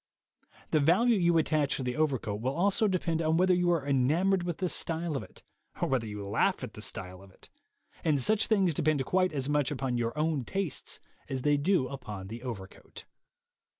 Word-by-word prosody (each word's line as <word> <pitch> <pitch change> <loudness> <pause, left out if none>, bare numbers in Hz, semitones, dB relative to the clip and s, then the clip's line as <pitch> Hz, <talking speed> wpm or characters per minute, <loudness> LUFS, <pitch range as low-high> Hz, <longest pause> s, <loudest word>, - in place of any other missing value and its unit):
The 155 - +4
value 190 +11 +4
you 170 -3 +3
attach 155 -3 +1
to 135 - -4
the 125 0 -2
over 155 -3 +2
coat 105 -2 -5
will 130 +3 -1
also 200 +5 +2
depend 170 -4 0
upon 160 0 +2
whether 185 +1 +4
you 175 0 +2
are 165 -5 +1
enamored 155 +8 +2
with 175 -2 -3
the 185 - -1
style 165 -2 -1
of 135 - -2
it, - - -14 0.4
or - - +1
whether 125 -4 0
you 105 -1 -6
laugh 100 - +1
at - - -6
the - - -9
style 90 0 -5
of 100 - -15
it; 95 - -16 0.5
and 150 -3 +2
such 215 - +2
things 195 -6 +3
depend 145 -2 +1
quite 185 +3 +2
as 140 -3 -2
much 145 -2 +1
upon 130 -3 -2
your 115 +3 -2
own 155 -3 0
tastes 190 +3 -3 0.3
as 130 -1 -3
they 145 0 +4
do 145 -1 +2
upon 105 -8 -7
the 115 +2 -7
overcoat. 105 -7 -8
150 Hz, 205 wpm, -29 LUFS, 125-175 Hz, 0.5 s, The